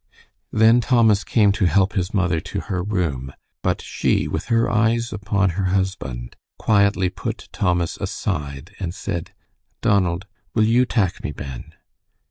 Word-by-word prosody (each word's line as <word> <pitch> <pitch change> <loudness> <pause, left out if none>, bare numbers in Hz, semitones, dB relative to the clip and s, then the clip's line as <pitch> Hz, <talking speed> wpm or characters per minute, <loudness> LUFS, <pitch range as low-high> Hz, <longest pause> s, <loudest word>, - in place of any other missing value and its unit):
Then 115 +2 +5
Thomas 115 -5 +4
came 105 -4 +3
to 100 0 +1
help 95 +4 +3
his 95 -1 -1
mother 90 -5 +1
to - - -5
her 90 -2 -3
room, 85 -10 -2 0.3
but - - -1
she, - - 0
with - - -3
her 115 0 +2
eyes 115 +1 +1
upon 100 -1 +1
her 95 +3 -2
husband, 90 -11 -2 0.2
quietly 100 -3 +3
put - - -6
Thomas 90 -3 0
aside 70 +6 -4
and 90 -2 -4
said, 85 -4 -4 0.5
"Donald, 95 -2 +1 0.3
will 110 - +4
you 120 +3 +3
tak 100 -8 0
me - - -2
ben?" 65 -2 -8
95 Hz, 145 wpm, -22 LUFS, 85-105 Hz, 0.5 s, Then